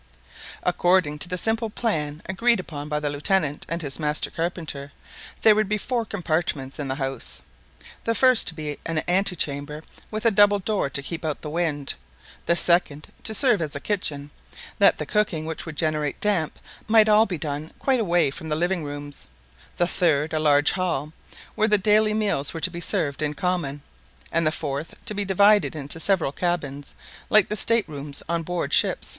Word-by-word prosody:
According 175 -4 +2
to 175 - +1
the 180 - -2
simple 225 +4 0
plan 155 -9 -2
agreed 230 +4 +2
upon 150 -5 -7
by 150 0 -1
the 150 -1 -2
Lieutenant 150 0 0
and 165 +1 -3
his 140 0 -2
master 150 0 -1
carpenter, 160 -4 -4 0.5
there 220 - +8
were 215 - +2
to 210 - -3
be 215 - +1
four 235 +2 -2
compartments 160 -9 -2
in 145 - -3
the 130 - -2
house: 135 -1 -4 0.6
the 230 - 0
first 255 -2 +5
to 165 - 0
be 150 -2 -5
an 165 -2 -2
antechamber 155 -5 0 0.3
with 215 +1 -4
a 230 - +5
double 205 0 +5
door 200 -6 -1
to 140 +1 -3
keep 165 +4 -5
out 155 -3 -3
the 150 - -5
wind; 155 -4 -1 0.5
the 170 - +3
second 170 -4 +2
to 220 - 0
serve 235 -6 +4
as 150 -3 -3
a - - -3
kitchen, 145 -6 -2 0.5
that 200 - +6
the - - -4
cooking 195 -7 0
which 160 +1 -5
would 160 - -6
generate 155 -3 -1
damp, 190 -7 0 0.3
might 220 0 +6
be 215 - +2
all 215 +1 +6
done 155 -3 -4
quite 265 -2 +1
away 175 -8 +2
from 160 +2 -8
the 150 - 0
living 175 +1 0
rooms; 145 0 -7 0.5
the 175 - +3
third, 160 -4 +1
a 155 - +1
large 145 -1 +4
hall, 165 -5 -2 0.4
where 215 - +2
the 210 -1 +5
daily 215 +1 +3
meals 200 -10 0
were 165 - -5
to 185 - +1
be 170 0 -6
served 145 -3 -1
in 150 -1 -1
common; 165 -7 -2 0.5
and 165 -1 +2
the - - +3
fourth, 145 0 -4
to - - 0
be 205 0 -1
divided 200 0 +4
into 145 +2 -4
several 175 -5 +1
cabins, 145 -4 -3 0.3
like 215 -3 +5
the 210 - -1
state 230 -1 +3
rooms 145 -1 -7
on 170 0 -1
board 175 +1 -3
ship. - - +2
165 Hz, 190 wpm, -24 LUFS, 150-200 Hz, 0.6 s, there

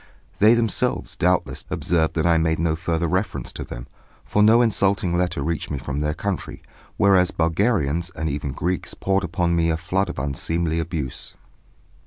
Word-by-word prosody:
They 110 +3 +6
themselves, 115 -4 0
doubtless, - - 0
observed 80 -3 0
that 80 -1 +1
I 85 -1 +4
made 80 0 +1
no 80 -1 +1
further 85 0 -1
reference 90 +4 -2
to - - -5
them, - - -8 0.4
for 105 - +1
no 115 +3 +6
insulting 100 -5 +1
letter 90 -5 0
reached 80 0 -2
me 75 - -2
from 70 0 -4
their 75 0 -1
country, 100 -3 -4 0.3
whereas 95 -3 +4
Bulgarians 85 - +1
and 80 - -2
even 70 -1 -3
Greeks 90 +6 -3
poured 95 +1 0
upon 85 0 0
me 85 0 +2
a 80 - +1
flood 95 +3 -1
of - - -6
unseemly 80 +4 -1
abuse. 80 -6 -4
85 Hz, 170 wpm, -23 LUFS, 80-95 Hz, 0.4 s, They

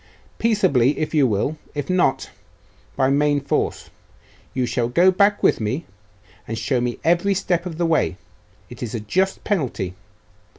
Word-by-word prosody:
'Peaceably, 180 - +2
if 155 - -2
you 145 -4 +4
will; 115 +8 -1 0.2
if 145 -2 -3
not, 175 -8 +1 0.6
by 130 0 +2
main 145 +1 +2
force. 140 - -2 0.6
You 130 - -1
shall 120 0 -1
go 175 +9 +5
back 200 +2 +2
with - - +4
me, 130 +10 -2 0.6
and 115 - -4
show 125 +1 0
me 120 -1 -2
every 175 +4 +2
step 180 -2 -1
of 165 -3 -7
the 170 - +1
way. 160 - +1 0.5
It - - -12
is 120 0 -4
a - - -2
just 185 - -1
penalty. 125 - -2
145 Hz, 160 wpm, -22 LUFS, 125-180 Hz, 0.6 s, go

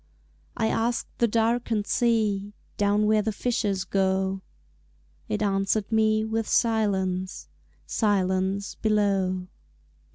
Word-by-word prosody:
I 220 - +1
asked 230 +2 -1
the 235 - +4
darkened 225 -1 0
sea 210 -4 +1 0.2
Down 205 +1 +2
where 215 0 +3
the 220 +1 -1
fishers 210 -4 -1
go 190 0 0 0.9
It 105 - -1
answered 195 +1 0
me 220 0 +2
with 220 0 -2
silence, 190 -5 0 0.4
Silence 195 -1 0
below. 195 -4 0
205 Hz, 100 wpm, -26 LUFS, 195-220 Hz, 0.9 s, the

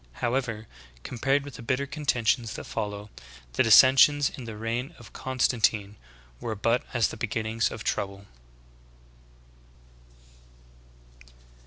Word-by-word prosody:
However, 120 - -2 0.4
compared 135 +3 0
with 145 - -9
the - - -9
bitter 130 +4 -1
con 150 +1 -8
tentions 115 -2 +1
that - - -6
follow, 105 0 -5 0.4
the - - +2
dissensions 135 +5 +6
in 130 - -9
the 110 -2 -7
reign 120 +8 -3
of 120 - -15
Constan 130 -2 -1
tine 105 -1 +1 0.4
were 110 - -4
but 115 +4 +1
as 120 -3 +2
the - - -8
beginnings 110 0 -1
of - - -7
trouble. 100 0 -3
115 Hz, 125 wpm, -27 LUFS, 110-130 Hz, 0.4 s, dissensions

